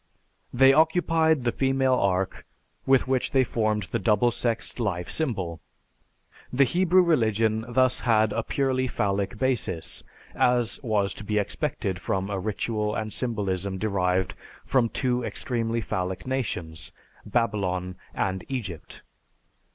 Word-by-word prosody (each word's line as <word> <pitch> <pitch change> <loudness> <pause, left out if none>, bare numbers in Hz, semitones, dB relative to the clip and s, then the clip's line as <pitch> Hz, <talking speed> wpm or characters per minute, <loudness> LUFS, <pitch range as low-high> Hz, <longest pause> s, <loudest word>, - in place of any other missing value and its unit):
They 135 +2 +6
occupied 160 -1 +3
the 120 - +1
female 135 0 +2
ark 95 -5 0 0.4
with 135 -1 +4
which 130 -1 +1
they 135 -1 +5
formed 110 -3 0
the - - -3
double 115 +2 +3
sexed 115 +1 -2
life 90 -6 -1
symbol. 95 - -2 0.9
The 135 +2 +4
Hebrew 180 +5 +4
religion 110 - +2
had 120 +1 -10
thus 130 -1 +3
a 110 0 +3
purely 130 -2 0
phallic 100 -1 -1
basis, 105 -10 -2 0.3
as 125 -2 +2
was 105 -6 0
to - - -8
be 105 +1 -1
expected 105 - -2
from 95 +1 -2
a 100 - -1
ritual 105 +1 -2
and 110 -1 -3
symbolism 100 -5 -2
derived 95 -3 0 0.3
from 125 -3 +2
two 125 -1 0
extremely 115 -1 -2
phallic 95 -2 -3
nations, 90 -11 -3 0.3
Babylon 95 -5 -1 0.2
and 95 -1 -1
Egypt." 100 - -6
110 Hz, 130 wpm, -26 LUFS, 100-130 Hz, 0.9 s, They